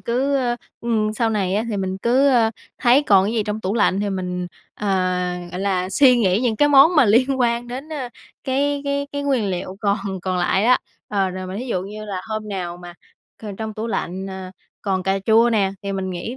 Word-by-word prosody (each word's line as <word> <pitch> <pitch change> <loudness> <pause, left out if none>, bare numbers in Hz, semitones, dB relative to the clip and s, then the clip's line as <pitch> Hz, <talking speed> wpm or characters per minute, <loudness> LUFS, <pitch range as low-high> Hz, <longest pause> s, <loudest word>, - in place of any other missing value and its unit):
cứ, 265 +4 0
ơ, 245 -2 0 0.2
ừm, 220 -2 0
sau 225 +1 0
này 195 -3 0
á 215 +3 0
thì 210 - -2
mình 190 0 -3
cứ, 255 +6 +3
ơ, 235 -4 +4 0.3
thấy 255 +3 +4
còn 195 -7 +4
cái 210 - -1
gì 225 -2 +1
trong 210 +1 -4
tủ 195 +2 -2
lạnh 200 -3 +2
thì 205 -1 -1
mình, 180 -1 -3 0.3
ờ, 210 - -5 0.6
gọi 180 - -5
là, 185 -2 0
suy 250 +5 +5
nghĩ 195 -1 +2
những 235 -4 0
cái 290 - +4
món 290 +4 +6
mà - - +7
liên 255 +5 +3
quan 235 0 +1
đến, 265 +5 -6
a, 265 -5 -4 0.4
cái 280 +2 0
cái 280 0 -1
cái 285 0 -3
nguyên 265 -7 +1
liệu 185 +1 -4
còn 200 0 +1 0.2
còn 185 -1 -1
lại 180 +3 +1
á. 250 +2 +5 0.3
Ờ, 195 -2 0
rồi 185 0 -6
mà 185 +2 -6
thí 255 - -5
dụ 185 -7 -1
như 210 +2 -8
là 195 -3 -4
hôm 215 -1 -4
nào 175 -3 -4
mà 175 -1 -11 0.5
c - - -9
trong 220 -1 -4
tủ 220 +1 -4
lạnh, 190 -3 -3
à, 190 -1 -7 0.3
còn 190 -2 -1
cà 195 +1 0
chua 230 +2 +5
nè, 200 -4 +1
thì 200 0 -3
mình 190 -1 -3
nghĩ 185 +8 -5
215 Hz, 230 wpm, -21 LUFS, 190-245 Hz, 0.6 s, mà